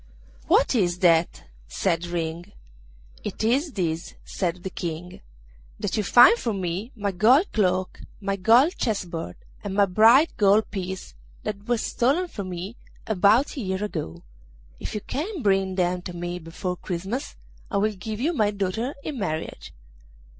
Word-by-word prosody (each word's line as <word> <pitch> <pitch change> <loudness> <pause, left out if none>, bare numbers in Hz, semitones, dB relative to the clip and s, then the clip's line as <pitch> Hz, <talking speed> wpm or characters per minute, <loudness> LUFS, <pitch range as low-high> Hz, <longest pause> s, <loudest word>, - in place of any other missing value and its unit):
'What - - +4
is 180 -7 +1
that?' 165 - +3 0.2
said 170 - -1
Ring. 170 +2 -4 0.7
'It - - -4
is 270 +7 +1
this,' 170 -3 -3
said 180 -2 -3
the 190 - -4
King: 175 +1 -6 0.6
'that - - -2
you 215 - +1
find 245 - +7
for 230 - -1
me 190 +5 -3
my 205 -2 -2
gold 240 - +4
cloak, 185 -3 0 0.2
my 200 -1 -1
gold 235 - +4
chess 215 -5 -1
board, 165 - -6 0.3
and 200 -2 -4
my 200 0 +5
bright 225 - +5
gold 205 +1 +4
piece, 190 -1 -5 0.3
that 205 -1 -5
were 240 0 +2
stolen 275 +11 +1
from 195 - -6
me 185 +6 -6 0.3
about 220 +6 +3
a 275 - -4
year 190 -1 -2
ago. 85 - -5 0.6
If - - -5
you 210 - -2
can 325 - -4
bring 195 -2 +2
them 180 -1 0
to 180 - -7
me 175 +1 -4
before 180 +2 -5
Christmas 190 - -4 0.3
I 200 - -1
will 215 +2 +1
give 210 +3 -6
you 310 +8 +1
my 215 -8 +2
daughter 205 +6 -2
in 290 -5 -5
marriage. 155 -5 -4
195 Hz, 160 wpm, -25 LUFS, 180-225 Hz, 0.7 s, find